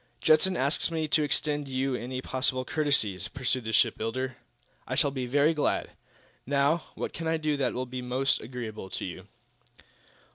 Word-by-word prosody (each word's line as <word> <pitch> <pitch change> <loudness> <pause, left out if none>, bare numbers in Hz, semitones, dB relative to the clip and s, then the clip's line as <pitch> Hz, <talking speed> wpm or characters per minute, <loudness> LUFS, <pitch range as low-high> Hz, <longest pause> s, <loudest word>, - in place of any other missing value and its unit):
"Judson 170 +4 +4
asks 140 +6 +1
me 160 -2 -1
to 155 - +4
extend 150 0 +1
to - - -8
you 130 +1 0
any 125 +1 -4
possible 130 0 0
courtesies," 140 -11 +1
pursued 130 0 -2
the 110 - -2
shipbuilder. 120 +4 +1 0.5
"I - - -2
shall 145 - +3
be 130 -2 -3
very 145 +5 +3
glad. 150 - 0 0.5
Now, 145 +4 +2
what - - -4
can 165 0 -4
I 165 0 +2
do 155 -1 0
that 135 -3 0
will 130 +1 -2
be 125 0 -5
most 130 +2 +1
agreeable 110 -5 -6
to - - -4
you?" 95 +1 -7
130 Hz, 175 wpm, -28 LUFS, 125-150 Hz, 0.5 s, Judson